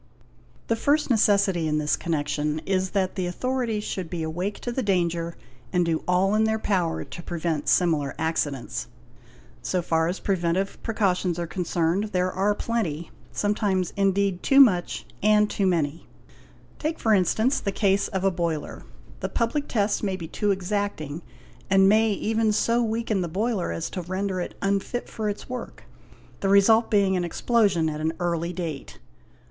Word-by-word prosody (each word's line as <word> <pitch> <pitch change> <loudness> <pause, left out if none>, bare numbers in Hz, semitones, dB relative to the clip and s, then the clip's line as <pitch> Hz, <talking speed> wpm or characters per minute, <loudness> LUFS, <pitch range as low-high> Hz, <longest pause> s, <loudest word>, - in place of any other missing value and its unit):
The 230 - +1
first 285 +4 +1
necessity 200 -6 +3
in 150 0 +1
this 150 0 +1
connection 150 -2 -1
is 190 -1 0
that 190 -2 0
the 185 -2 -2
authorities 235 +2 -2
should 185 -5 -4
be 170 -2 -3
awake 175 +6 -3
to 240 - -3
the 260 - -1
danger 170 -5 0 0.3
and 180 -1 +2
do 165 -1 -1
all 185 +2 +3
in 215 +1 +3
their 220 0 +1
power 185 -6 0
to - - -9
prevent 165 -3 -2
similar 155 -6 +2
accidents. 145 -7 -2 0.7
So 180 -2 -1
far 160 -1 +1
as 180 +3 -2
preventive 185 0 -1
precautions 190 -6 0
are 170 - -2
concerned, 175 +2 0
there 185 -3 0
are 200 +3 +1
plenty—some 205 -1 -2
times 190 -4 0
indeed 195 -1 +1
too 275 - +4
much 185 -10 +4 0.2
and 210 0 +4
too 200 -2 0
many. 165 -3 -1 0.7
'Take 315 +2 -2
for 220 - +2
instance 220 +7 +2
the 200 - -2
case 195 0 +2
of 190 -2 -3
a 195 - +3
boiler; 170 -4 -3 0.4
the - - -3
public 260 +5 -1
tests 205 -2 0
may 195 -3 -1
be 170 -3 -6
too 205 +5 -1
exacting 190 -5 -2 0.5
and 195 0 +5
may 220 +2 +4
even 220 +2 +1
so 230 +3 +2
weaken 225 -3 0
the 175 - -1
boiler 200 - -1
as 85 0 -3
to 185 - -4
render 185 +1 -2
it - - -6
unfit 200 +5 -1
for 215 -1 -3
its 205 - -6
work, 250 0 -7 0.6
the 195 - 0
result 220 +4 +5
being 200 -2 +3
an 180 - 0
explosion 190 -2 +2
at 155 0 -3
an 160 +1 0
early 170 -1 -1
date. 165 - -6
190 Hz, 165 wpm, -25 LUFS, 170-210 Hz, 0.7 s, and